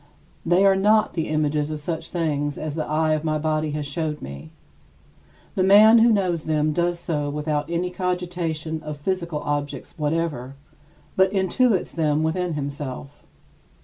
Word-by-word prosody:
They 175 +4 +3
are 195 -1 +5
not 210 +3 +3
the 160 -2 -2
images 150 -1 0
of 155 -1 -4
such 160 +2 -4
things 145 -4 -1
as 155 -1 -4
the 155 0 -2
eye 155 +1 +1
of 155 0 -1
my 155 -1 0
body 155 0 -1
has 150 -1 -3
showed 150 +1 -3
me. 70 +3 -9 1.0
The - - 0
man 210 +4 +7
who 230 +1 +5
knows 180 -6 0
them 155 -1 +1
does 175 +1 0
so 150 -4 -2
without 150 0 -2
any 175 +1 -1
cogitation 175 -4 -3
of 150 -1 -6
physical 170 -1 -2
objects 145 -1 -3
whatever, 150 -4 -2 0.6
but 190 0 +4
intuits 195 +2 +1
them 155 -2 +1
within 170 +1 -1
himself. 140 -1 -6
155 Hz, 155 wpm, -23 LUFS, 150-180 Hz, 1.0 s, man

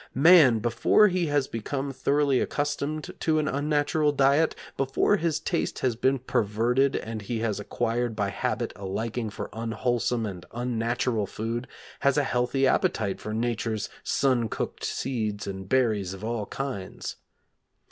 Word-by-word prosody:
Man, 145 -4 +7
before 120 - +4
he 180 -2 0
has 145 -2 +1
become 135 +5 -3
thoroughly 140 0 +2
accustomed 145 +1 -2
to 160 -1 +2
an 155 -1 +1
unnatural 150 +1 +1
diet, 140 +3 +3 0.2
before 135 +9 +2
his 160 -3 0
taste 170 +2 -2
has 125 -3 +1
been 130 +3 +2
perverted 120 +3 +1
and 110 -1 -4
he 115 +3 -3
has 110 -4 -1
acquired 120 +2 -1
by 100 -2 0
habit - - -2
a 100 - -11
liking 110 +4 -3
for - - -7
unwholesome 115 +1 -1
and 95 -4 -6
unnatural 120 -2 -1
food, 115 +5 -4 0.3
has 140 0 +2
a 145 - +4
healthy 125 +1 +1
appetite 105 -6 +1
for 105 - -5
Nature's 115 -1 -1
sun 125 -5 +1
cooked - - -4
seeds 110 -6 -2
and 95 -1 -6
berries 110 -8 +1
of 95 - -12
all 110 -2 -2
kinds. 130 -9 -5
120 Hz, 145 wpm, -27 LUFS, 110-140 Hz, 0.3 s, Man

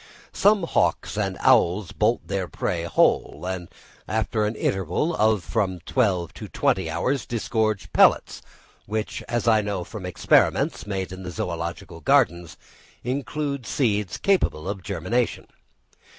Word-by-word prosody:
Some 205 -2 +4
hawks 170 - 0
and - - -1
owls 90 +1 +3
bolt 80 - 0
their 95 -1 -2
prey 85 -1 -2
whole, 85 - +1
and 90 -2 -4 0.4
after 110 -1 0
an 110 - -3
interval 95 - -1
of 110 - +2
from 95 -5 -1
twelve 95 - 0
to - - -8
twenty 95 -4 0
hours, 130 - -1
disgorge 110 -3 -1
pellets, - - +4 0.5
which, 110 +1 -3
as 120 -1 -1
I 110 -2 +5
know 100 -3 -3
from 95 0 -7
experiments 90 - +2
made 95 -2 -3
in 95 0 -8
the 90 - -6
Zoological 85 0 -5
Gardens, 85 -2 +2 0.5
include 140 +1 -3
seeds 105 - 0
capable 180 - +1
of 100 -1 -4
germination. 100 +7 -1
100 Hz, 135 wpm, -24 LUFS, 90-115 Hz, 0.5 s, I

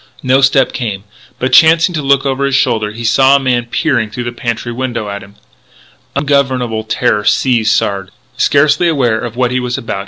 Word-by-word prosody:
No 130 +1 +2
step 135 -1 +2
came. 105 -5 -4 0.3
But, 130 - -2
chancing 165 +2 +5
to 155 - -2
look 140 -1 +1
over 135 0 -1
his 140 -1 0
shoulder, 115 -6 0
he 115 +2 -8
saw 130 +4 +4
a - - +3
man 125 -3 -1
peering 120 -4 -1
through 120 +3 -6
the 120 - -4
pantry 120 0 -4
window 120 -3 -4
at 100 0 -6
him. 100 +1 -15 0.8
Ungovernable 130 -5 0
terror 105 -1 0
seized 115 -1 +1
Sard. 95 -1 -2
125 Hz, 150 wpm, -13 LUFS, 110-135 Hz, 0.8 s, chancing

